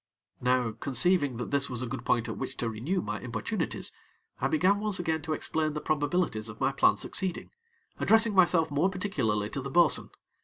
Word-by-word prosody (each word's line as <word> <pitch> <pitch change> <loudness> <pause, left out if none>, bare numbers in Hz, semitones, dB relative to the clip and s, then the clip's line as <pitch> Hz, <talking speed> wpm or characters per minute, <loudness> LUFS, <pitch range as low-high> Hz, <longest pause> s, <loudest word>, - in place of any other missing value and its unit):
Now, 125 -2 +1
conceiving 140 0 +3
that 125 - -5
this 140 0 +1
was 125 -1 -4
a - - -2
good 125 0 -6
point 120 -1 +1
at - - -4
which 135 -1 -6
to 115 - -2
renew 145 - -2
my - - -4
importunities, - - -3 0.5
I - - +1
began 200 - +2
once 210 -2 0
again 160 -2 -1
to 155 0 -3
explain 155 0 -1
the 150 - -3
probabilities 145 -7 -1
of 105 - -10
my - - +1
plan - - +3
succeeding, 185 -2 -2 0.5
addressing 225 0 +4
myself 175 -4 +3
more 150 +7 +2
particularly 125 - -2
to 135 - -3
the 135 - -6
bo'sun. 165 0 +3
150 Hz, 190 wpm, -28 LUFS, 125-180 Hz, 0.5 s, addressing